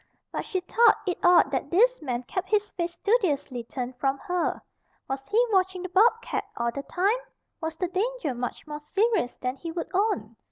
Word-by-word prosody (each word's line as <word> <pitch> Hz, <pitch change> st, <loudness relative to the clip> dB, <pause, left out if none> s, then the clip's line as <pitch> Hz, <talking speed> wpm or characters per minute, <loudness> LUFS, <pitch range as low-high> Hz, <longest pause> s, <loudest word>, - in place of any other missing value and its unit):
But -, -, -3 dB
she 375 Hz, -4 st, -2 dB
thought 460 Hz, +6 st, +5 dB
it 360 Hz, -2 st, -1 dB
odd 350 Hz, -6 st, +6 dB
that 270 Hz, +1 st, -2 dB
this 485 Hz, +8 st, +4 dB
man 250 Hz, -4 st, -2 dB
kept 365 Hz, +9 st, -4 dB
his 420 Hz, -1 st, +1 dB
face 340 Hz, -1 st, -3 dB
studiously 300 Hz, -, 0 dB
turned 250 Hz, +1 st, -5 dB
from 270 Hz, +1 st, +1 dB
her. 360 Hz, +1 st, -1 dB, 0.5 s
Was 270 Hz, 0 st, -4 dB
he 465 Hz, +3 st, +3 dB
watching 375 Hz, -2 st, +1 dB
the 370 Hz, -, -4 dB
bobcat 455 Hz, +5 st, +3 dB
all 235 Hz, 0 st, 0 dB
the 280 Hz, -, -4 dB
time? 390 Hz, -, +1 dB, 0.4 s
Was 320 Hz, 0 st, -3 dB
the 360 Hz, -, 0 dB
danger 390 Hz, -, -1 dB
much 245 Hz, 0 st, -5 dB
more 300 Hz, -1 st, -6 dB
serious 390 Hz, -, +1 dB
than 255 Hz, +1 st, -3 dB
he 330 Hz, +4 st, -6 dB
would 335 Hz, +1 st, -5 dB
own? 295 Hz, -, 0 dB
350 Hz, 190 wpm, -27 LUFS, 270-410 Hz, 0.5 s, odd